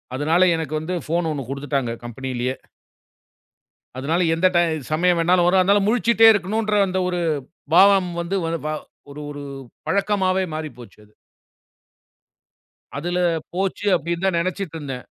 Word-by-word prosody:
அதனால 155 +6 +1
எனக்கு 155 -2 -4
வந்து 170 +4 -4
ஃபோன் 165 +1 0
ஒண்ணு 140 -3 -4
குடுத்துட்டாங்க 140 -3 -2
கம்பனிலயே 125 +1 -4 1.4
அதனால 160 +7 0
எந்த 175 +3 +3
டைம் 160 -4 +1
சமயம் 175 +2 +2
வேணாலும் 175 +1 +3
வரும். 185 +1 +4
அதனால 200 +2 +4
முழிச்சுகிட்டே 230 -1 +4
இருக்கணுன்ற 210 +2 -1
அந்த 185 0 -1
ஒரு 180 -1 -2 0.6
பாவம் 195 -1 +6
வந்து 170 +3 -3
ஒரு 165 0 -1 0.7
ஒரு 145 0 -7 0.5
பழக்கமாவே 190 -2 +1
மாறிப்போச்சு 135 -7 -8
அது. 105 - -26 1.9
அதுல 175 +5 -2 0.3
போச்சு 195 +2 -2
அப்படின்னு 170 +3 -3
தான் 185 -3 +1
நினைச்சுட்டு 185 -1 -3
இருந்தேன். 135 -4 -6
170 Hz, 125 wpm, -22 LUFS, 145-190 Hz, 1.9 s, பாவம்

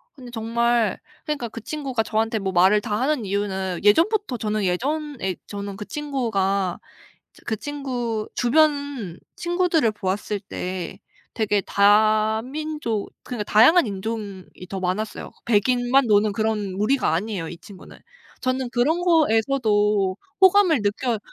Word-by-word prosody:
근데 250 -3 -11
정말 230 -1 0 0.3
그러니까 295 -6 -2
그 230 - -8
친구가 265 -2 -3
저한테 220 0 0
뭐 190 -1 -2
말을 190 +4 +5
다 210 0 -2
하는 265 -4 0
이유는 190 -2 -2
예전부터 330 - +3
저는 215 -1 -2
예전에 260 - -2
저는 200 -1 -6
그 210 - -6
친구가 200 -10 -1 0.5
저 - - -20
그 220 - -1
친구 245 -6 -3
주변 285 - +1 0.2
친구들을 345 -8 +1
보았을 205 +1 -3
때 185 -2 -6 0.4
되게 210 -2 +1
다민족 220 +6 +1
그러니까 220 -4 -5
다양한 260 +10 +7
인종이 200 -1 -5 0.2
더 195 - -4
많았어요. 190 +4 -3 0.2
백인만 245 +3 +3
노는 210 0 +3
그런 210 -3 -1
무리가 215 - +1
아니에요 185 -2 -2
이 170 - -8
친구는. 190 +1 -14 0.4
저는 255 -1 -1
그런 305 +8 +1
거에서도 220 - +2 0.2
호감을 370 - +5
느껴 215 +2 -1
220 Hz, 295 characters per minute, -23 LUFS, 200-265 Hz, 0.5 s, 다양한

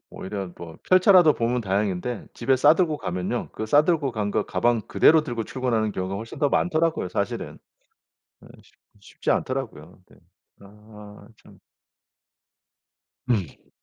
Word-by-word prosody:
오히려 95 -1 -6
뭐 85 -1 -10
펼쳐라도 185 -3 +6
보면 120 +1 -1
다행인데 100 +2 -2
집에 130 +2 +1
싸 145 +4 +5
들고 165 -4 0
가면요 90 +5 -4
그 110 - -5
싸 145 +7 +5
들고 150 -7 0
간 105 -2 -2
거 105 - 0
가방 115 +5 0
그대로 160 +7 +4
들고 120 -6 -4
출근하는 115 -5 -1
경우가 95 +1 -4
훨씬 110 +3 -8
더 145 - +2
많더라고요 165 - 0
사실은. - - -4 0.9
예 - - -15
쉽 - - -26 0.2
쉽지 100 - -4
않더라고요. 110 - -4
네. - - -20 0.4
아 105 0 -15 0.2
참. - - -18 1.7
음. 100 - -3
115 Hz, 285 characters per minute, -24 LUFS, 100-140 Hz, 1.7 s, 펼쳐라도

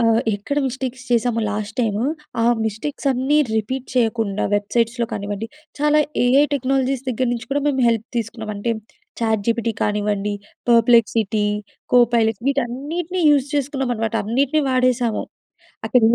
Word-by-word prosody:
ఆహ్, 230 -1 +4
ఎక్కడ 245 +9 -2
మిస్టేక్స్ 255 0 -4
చేశామో 235 -1 +2
లాస్ట్ 210 +1 -4
టైమ్, 210 -3 0 0.4
ఆ - - +3 0.2
మిస్టేక్స్ 275 +7 -4
అన్నీ 265 +4 +2 0.2
రిపీట్ 255 +5 -2
చేయకుండా 225 -4 +1
వెబ్‌సైట్స్‌లో 230 +3 0
కానివ్వండి, 205 +1 -4 0.3
చాలా 300 +1 +3 0.3
ఏఐ 270 +4 +5
టెక్నాలజీస్ 265 0 0
దగ్గర 255 +1 0
నుంచి 240 0 -4
కూడా, 285 +1 +1
మేము 270 -3 +1
హెల్ప్ 230 0 0
తీసుకున్నాం. 220 -1 -3
అంటే, 220 +4 -2 0.5
చాట్‌జీపీటీ 230 +1 0
కానివ్వండి, 210 0 0 0.4
పర్‌ప్లెక్సిటీ, 230 -2 +4 0.5
కో 250 - +7 0.2
పైలట్స్ 225 -1 +1
వీటన్నిటిని 290 +8 -2
యూజ్ 280 -2 +3
చేసుకున్నాం 270 -2 -1
అనమాట, 225 0 -2
అన్నిటిని 275 +7 +1
వాడేశాము. 250 -3 +1 0.6
అక్కడ 245 +3 +4
ఏం 230 - +4
235 Hz, 135 wpm, -21 LUFS, 220-265 Hz, 0.6 s, కో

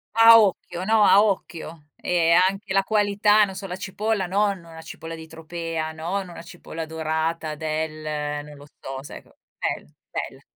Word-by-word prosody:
A 225 0 +9
occhio, 185 -3 0
no, 220 0 +4
a 195 +2 +7
occhio. 170 -6 -2 0.2
E 170 -2 +2
anche 190 +3 +3
la 195 - +3
qualità, 210 0 +3
non 195 -2 -2
so, 195 - -6
la 180 - -4
cipolla 195 +1 -2
non 200 +1 +1
una 165 -1 -12
cipolla 165 0 -8
di 160 0 -10
tropea, 165 0 -4
non, 175 +4 -3
una 170 - -9
cipolla 165 -2 -7
dorata 160 0 -2
del 155 -1 -3
non 150 - -12
lo 145 0 -13
so, 135 0 -6
sai - - -9
com - - -24 0.3
bella, - - -3 0.2
bella. - - -5
170 Hz, 170 wpm, -24 LUFS, 160-195 Hz, 0.3 s, A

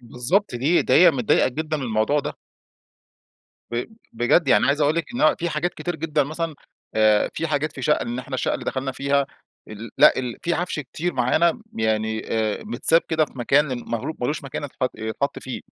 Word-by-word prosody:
بالضبط، 125 - -1
دي 140 +8 +2
ده - - +2
هي 175 0 +8
متضايقة 125 -7 +2
جدًا 155 +4 -3
من 145 - -5
الموضوع 115 +4 +1
ده. - - -4 1.4
ب 120 +1 -2 0.3
بجد، 120 +7 +2
يعني 115 -1 +5
عايز 140 +3 +1
أقول 150 +2 +2
لك، 170 - 0
إن - - -3
هو 155 - +4
في 170 - -1
حاجات 160 +3 -2
كتير 175 -2 -4
جدًا 155 -1 0
مثلًا، 160 +2 -4 0.4
آآ، 110 -1 +3
في 165 - -2
حاجات 150 0 -1
في 135 - -8
شقّة - - +2
إن 120 +1 -4
إحنا 130 +1 -6
الشقّة - - 0
اللي - - -5
دخلنا 135 0 -2
فيها 140 +1 +1 0.4
ال 110 +2 -8
لأ، 150 - +7
ال 125 -3 -3
في 170 - 0
عفش 175 -3 -2
كتير 155 +6 -4
معانا، 130 +7 +3
ب 225 - -15
يعني، 110 0 0
آآ، 110 -2 -1
متساب 170 -6 +2
كده 160 -2 +2
في - - -17
مكان 130 0 +1
ماغلو 120 +7 -3
مالوش 145 +4 -2
مكان 140 +1 -5
اتحط 130 -2 -2
يتحط 110 +6 -3
فيه. 130 - -6
140 Hz, 200 wpm, -23 LUFS, 120-155 Hz, 1.4 s, هي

